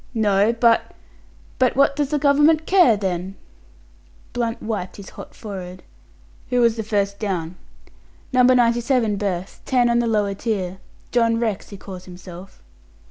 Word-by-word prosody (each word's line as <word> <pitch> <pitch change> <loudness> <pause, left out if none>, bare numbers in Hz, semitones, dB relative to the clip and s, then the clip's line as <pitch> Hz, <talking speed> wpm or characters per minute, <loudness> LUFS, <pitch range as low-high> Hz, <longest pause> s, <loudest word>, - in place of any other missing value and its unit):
"No 205 -1 +3
but 235 0 +2 0.3
" - - -29
"But 255 -1 +2
what 280 +1 +3
does 290 -2 -1
the 300 - 0
Government 295 +2 +3
care, 355 - +5
then?" 190 -1 -3 1.0
Blunt 235 -1 -2
wiped 210 -5 -4
his 200 -2 -10
hot - - -11
forehead. 185 -4 -8 0.7
"Who 250 -1 +1
was 235 -2 +3
the 225 - -3
first 200 -2 -1
down?" 180 -5 -3 0.8
"No. 255 - +5
97 240 -2 +3
berth; 190 -3 -4
ten 245 -2 +2
on 235 - +2
the 240 - 0
lower 210 -3 +1
tier. 190 -4 -3 0.3
John 230 -1 +2
Rex 220 -4 -2
he 200 - -9
calls 185 -1 -10
himself." 180 - -12
220 Hz, 150 wpm, -21 LUFS, 195-245 Hz, 1.0 s, care